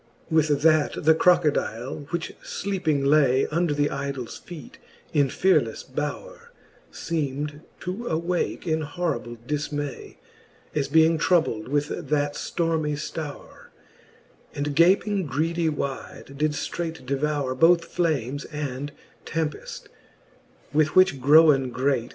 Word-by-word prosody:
with 150 -2 +2
that 155 -2 +3
the 160 - +7
Crocodile, 150 -7 +1
which 170 -1 -3
fleeping 175 -8 -1
lay 140 -3 +4
Under 170 0 +1
the 145 0 +1
idols 140 -3 -5
feete 170 -5 -11 0.3
in 145 -3 +4
fearlefTe 190 +8 +1
bowre, - - -5 0.4
Seem'd 150 -2 -3 0.2
to 195 +7 -5
awake 170 +3 -1
in 160 -2 0
horrible 145 -7 -3
difniay, 145 -1 -4 0.6
As 145 -2 0
being 160 0 +4
troubled 155 -11 +1
with 145 +2 0 0.2
that 145 -1 +1
ftormy 160 -2 -1
ftowre; 150 0 -7 0.9
And 145 0 -2
gaping 190 +2 +3
greedy 165 +3 0
wide, 140 -2 -5
did 150 +1 0
ftreight 160 -2 -4
devoure 140 0 -1
Both 165 +5 +4
flames 145 -6 -1
and 145 -2 -5 0.4
tempeft: 160 -2 -3 0.9
with 155 +1 +2
which 185 -7 +5
growen 140 -2 +6
great. 130 -1 0
150 Hz, 115 wpm, -25 LUFS, 140-165 Hz, 0.9 s, the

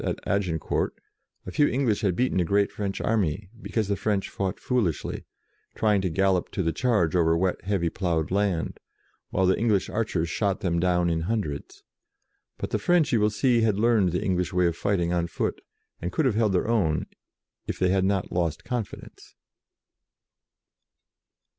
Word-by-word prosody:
at - - -2
Agincourt, 90 -6 -1 0.5
a 95 - -6
few 145 +10 +3
English 125 -6 +1
had 95 -4 +1
beaten 125 -3 +1
a - - +3
great 100 +4 +2
French 100 -2 -3
army, 100 -3 0
because 110 -3 -1
the 100 - +1
French 100 0 -1
fought 95 -2 -3
foolishly, 115 - -1 0.5
trying 105 -3 +2
to 95 - 0
gallop 95 +1 +1
to 95 - -2
the 80 -1 0
charge 105 -10 +1
over 80 -2 +3
wet, 90 +1 0
heavy 95 -4 0
ploughed 85 -2 -1
land, 100 -4 0 0.5
while 95 - +1
the 95 - +4
English 110 -4 +1
archers 105 -7 -1
shot 100 +2 -1
them 85 -2 0
down 90 0 +2
in 85 -1 +1
hundreds. 95 -11 -3 0.7
But - - -5
the - - 0
French, 175 -4 +3
you 115 - +4
will 105 0 +3
see, 115 +3 +2
had 110 -3 +2
learned 110 -4 +3
the 90 - -1
Eng 95 -2 +1
lish 90 -1 -1
way 90 0 +2
of 85 -1 +1
fighting 90 -2 0
on 85 -1 0
foot, 85 - -3 0.4
and 85 - -3
could 160 - 0
have 130 - +3
held 110 -2 +2
their 90 - +1
own, 100 -10 +1 0.6
if - - -3
they 90 - +2
had 95 0 +2
not 95 -1 0
lost 85 -3 -1
con 120 -2 -1
fidence. - - -14
95 Hz, 180 wpm, -26 LUFS, 85-105 Hz, 0.7 s, the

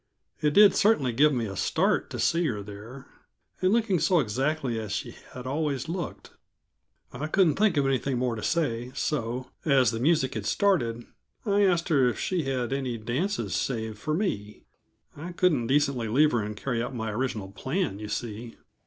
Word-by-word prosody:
It 150 -1 +1
did 205 -1 +8
certainly 150 - +3
give 150 +6 +5
me 120 -4 -1
a 100 -2 -6
start - - +1
to - - -6
see 170 0 +2
her 105 -6 -3
there, 105 +6 -10 0.6
and 185 0 +3
looking 220 -5 +2
so 180 0 +3
exactly 130 0 -1
as 105 -2 -6
she 100 - -4 0.2
had 125 0 -8
always 140 0 -2
looked. 170 +2 -5 0.8
I 155 - -4
couldn't 175 -1 +3
think 205 -5 +3
of 140 - +3
anything 135 -1 0
more 125 -1 0
to 110 - -6
say, 125 -7 -1
so, 130 -3 -2
as 135 -6 +4
the 115 - -3
music 145 0 +2
had 105 -2 -4
started, 120 - +1 0.4
I 205 -1 +3
asked 175 -3 +1
her 135 -6 +4
if - - -4
she 180 -5 -1
had 130 -2 -1
any 130 -3 -2
dances 135 - -2
saved 110 -4 -2
for 155 +7 -1
me. 105 - -3 0.5
I 170 +5 -7
couldn't 155 -10 +2
decently 140 -4 +1
leave 145 +7 +4
her 120 - +1
and 105 0 -5
carry 120 0 -2
out 125 +2 -4
my 110 -2 -3
original 105 -4 -3
plan, 130 - -2
you 105 - -6
see. 115 +1 -5
130 Hz, 185 wpm, -27 LUFS, 115-160 Hz, 0.8 s, did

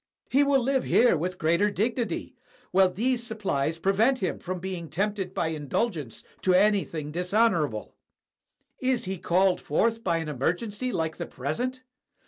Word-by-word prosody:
He 275 +3 +5
will 275 -2 +3
live 265 +1 +1
here 240 -5 +4
with 180 +3 -2
greater 170 +6 +2
dignity, 225 -1 -2 0.4
while 190 0 +5
these 240 +6 0
supplies 195 -10 -2
prevent 210 +9 +2
him 190 -7 -2
from 185 0 -4
being 175 -3 -5
tempted 195 +1 -2
by 165 -3 -1
indulgence 155 - -3 0.2
to 185 -1 +3
anything 185 -6 +2
dishonorable. 180 - +1 0.9
Is 255 -3 0
he 190 -1 -4
called 185 +2 +2
forth 225 +9 0
by 170 -3 +1
an 165 -1 -3
emergency 190 - -2
like 160 -4 -2
the - - -4
present? 245 - -3
190 Hz, 145 wpm, -27 LUFS, 165-230 Hz, 0.9 s, He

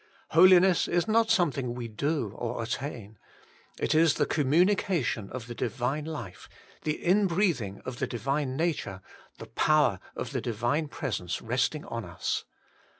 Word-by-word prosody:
Holiness 185 +1 +6
is 175 +4 +1
not 225 +1 +3
something 135 -9 +1
we 120 -1 -5
do 120 0 -2
or 120 -1 -3
attain: 115 -4 -5 0.6
it - - +1
is 160 -1 +4
the - - +2
communication 155 - +1
of 125 -2 -6
the 120 - -7
Divine 125 +6 -2
life, 150 - -7 0.3
the 155 -1 -1
inbreathing 175 - +1
of 125 -2 -6
the - - 0
Divine 135 +2 -2
nature, 145 - -2 0.3
the - - -8
power 150 -11 +2 0.2
of - - -5
the - - -2
Divine 120 +7 -1
Presence 120 - -3
resting 130 +6 -1
on 115 -1 -5
us. 85 -2 -3
140 Hz, 145 wpm, -28 LUFS, 115-165 Hz, 0.6 s, Holiness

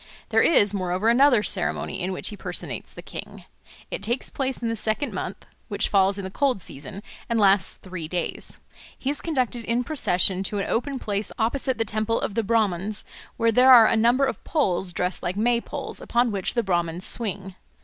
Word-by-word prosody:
There - - +4
is 205 -11 +4
moreover 185 +2 0
another 245 -2 +5
ceremony 190 0 -1
in 185 +2 -2
which 185 - -4
he 210 - -7
personates - - -5
the - - -11
king. - - -9 0.5
It - - -4
takes 235 +5 -2
place 265 -1 -2
in 235 - -2
the 230 - -1
second 220 +6 -1
month - - -5 0.2
(which - - -1
falls 195 -1 +3
in 200 - -5
the 190 - -6
cold 270 -1 +1
season) 160 +5 -9 0.3
and 230 -1 +1
lasts 200 -1 +4
three 185 -4 -7
days. 175 +1 -3 0.4
He 270 - -2
is 290 - -3
conducted 255 -7 -1
in 235 +2 0
procession 190 - +1
to 205 - -2
an 195 - -1
open 270 +4 -1
place 205 -3 -3
opposite 255 +3 0
the 225 - 0
Temple 215 +1 0
of - - -3
the 230 - +1
Brahmans, 210 -2 0 0.3
where 230 0 +3
there 255 +3 +6
are 235 -3 +10
a 225 - +3
number 240 +5 +3
of 265 - -4
poles 190 - 0
dressed 180 +1 -2
like 180 +3 -3
May 235 +2 +2
poles, 280 +1 -6
upon 240 0 +1
which 195 +2 -1
the 235 - +2
Brahmans 175 -1 -1
swing. 195 -4 -1
215 Hz, 200 wpm, -24 LUFS, 190-245 Hz, 0.5 s, are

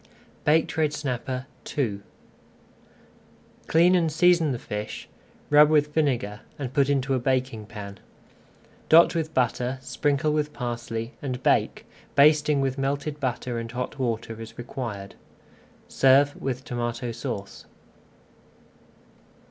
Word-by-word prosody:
BAKED 160 +2 +2
RED 155 -2 +2
SNAPPER 130 -3 -3 0.3
II 110 -8 0 1.7
Clean 170 +3 +5
and 170 -3 +2
season 170 -1 +4
the 125 - -2
fish, 105 -2 -6 0.4
rub 150 0 +7
with 150 -1 +2
vinegar, 120 -10 0 0.2
and 135 -4 -5
put 140 -2 +2
into 135 -1 +1
a 130 - +1
baking 125 -4 -1
pan. 100 -3 -9 0.9
Dot 165 +2 +7
with 160 -2 -3
butter, 125 +1 0
sprinkle 145 +3 0
with 150 -1 -1
parsley, 120 -1 -4
and 130 -2 -4
bake, - - +1 0.3
basting 150 0 +5
with 135 0 -1
melted 145 +2 -2
butter 125 -3 -2
and 115 0 -6
hot 125 +3 -4
water 115 -2 -3
as 115 - -10
required. 115 -5 -6 0.7
Serve 135 +2 +4
with 130 -1 -4
Tomato 120 0 -3
Sauce. 115 -4 -6
135 Hz, 120 wpm, -25 LUFS, 120-150 Hz, 1.7 s, rub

